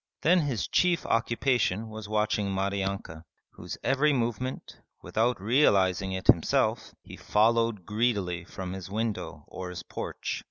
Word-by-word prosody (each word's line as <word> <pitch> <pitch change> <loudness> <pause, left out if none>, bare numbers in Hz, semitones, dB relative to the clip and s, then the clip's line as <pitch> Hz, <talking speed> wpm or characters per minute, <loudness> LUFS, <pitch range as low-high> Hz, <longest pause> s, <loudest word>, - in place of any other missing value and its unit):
Then 180 +3 +5
his 135 -9 -1
chief 180 -2 +2
occupation 115 -2 +1
was 110 -1 -8
watching 105 -1 +1
Maryanka, 95 -4 -2 0.3
whose - - -8
every 145 +3 +3
movement, 125 +1 -3 0.3
without 120 +1 0
realizing 95 -5 +3
it 95 0 -4
himself, - - +2
he - - -10
followed 115 -2 +2
greedily 105 -6 0
from 95 0 -6
his 95 -2 -7
window 110 +1 -3
or 90 -1 -7
his 90 - -7
porch. - - -5
105 Hz, 130 wpm, -28 LUFS, 95-120 Hz, 0.3 s, Then